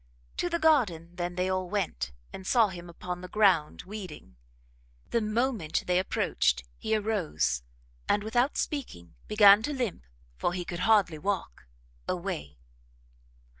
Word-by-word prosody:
To 350 Hz, -, 0 dB
the 340 Hz, -, 0 dB
garden 225 Hz, -, +2 dB
then 175 Hz, 0 st, -3 dB
they 180 Hz, +1 st, 0 dB
all 185 Hz, -1 st, -1 dB
went, 170 Hz, -, -2 dB, 0.2 s
and 190 Hz, -, -8 dB
saw 230 Hz, -4 st, +4 dB
him 175 Hz, -2 st, -9 dB
upon 180 Hz, +1 st, -6 dB
the 180 Hz, -, -7 dB
ground, 185 Hz, -7 st, +2 dB
weeding. 185 Hz, -, -9 dB, 0.8 s
The 235 Hz, -, +2 dB
moment 215 Hz, -, 0 dB
they 180 Hz, 0 st, +2 dB
approached 60 Hz, -, +1 dB, 0.2 s
he 220 Hz, -, 0 dB
arose, 185 Hz, -, 0 dB, 0.5 s
and, 205 Hz, -, +2 dB
without 240 Hz, +6 st, +1 dB
speaking, 90 Hz, -, -4 dB
began 210 Hz, -1 st, +7 dB
to 295 Hz, +6 st, -2 dB
limp, 235 Hz, -, -3 dB, 0.3 s
for 175 Hz, -, 0 dB
he 180 Hz, -1 st, -3 dB
could 175 Hz, 0 st, -5 dB
hardly 195 Hz, -8 st, +4 dB
walk; 180 Hz, -, -3 dB, 0.4 s
away. 75 Hz, -2 st, -4 dB
185 Hz, 140 wpm, -29 LUFS, 170-220 Hz, 0.8 s, began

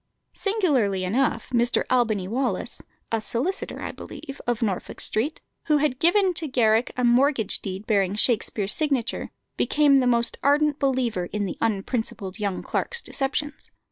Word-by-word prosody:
Singularly 280 Hz, -, +1 dB
enough 235 Hz, +9 st, 0 dB
Mr. 240 Hz, +1 st, +2 dB
Albany 220 Hz, -7 st, +1 dB
Wallis 250 Hz, +5 st, -2 dB, 0.3 s
(a 225 Hz, -1 st, 0 dB
solicitor, 265 Hz, -, -2 dB
I -, -, -3 dB
believe), 275 Hz, 0 st, -9 dB
of 240 Hz, -1 st, 0 dB
Norfolk 195 Hz, -5 st, -3 dB
Street, 265 Hz, +9 st, +1 dB, 0.2 s
who 300 Hz, -2 st, +3 dB
had 280 Hz, -3 st, 0 dB
given 370 Hz, +3 st, +3 dB
to 320 Hz, -1 st, 0 dB
Garrick 230 Hz, -3 st, +2 dB
a 250 Hz, -, 0 dB
mortgage 240 Hz, -2 st, +2 dB
deed 195 Hz, +1 st, -6 dB
bearing 200 Hz, -3 st, +1 dB
Shakspere's 210 Hz, -2 st, +1 dB
signature, 275 Hz, -7 st, 0 dB, 0.3 s
became 290 Hz, -2 st, +4 dB
the 255 Hz, -2 st, +2 dB
most 235 Hz, -1 st, +1 dB
ardent 295 Hz, +1 st, +2 dB
believer 250 Hz, -9 st, 0 dB
in 205 Hz, +3 st, -3 dB
the 185 Hz, -, -5 dB
unprincipled 220 Hz, -2 st, -2 dB
young 200 Hz, -3 st, -2 dB
clerk's 475 Hz, -1 st, -2 dB
deceptions. 290 Hz, +2 st, -3 dB
245 Hz, 145 wpm, -24 LUFS, 215-285 Hz, 0.3 s, became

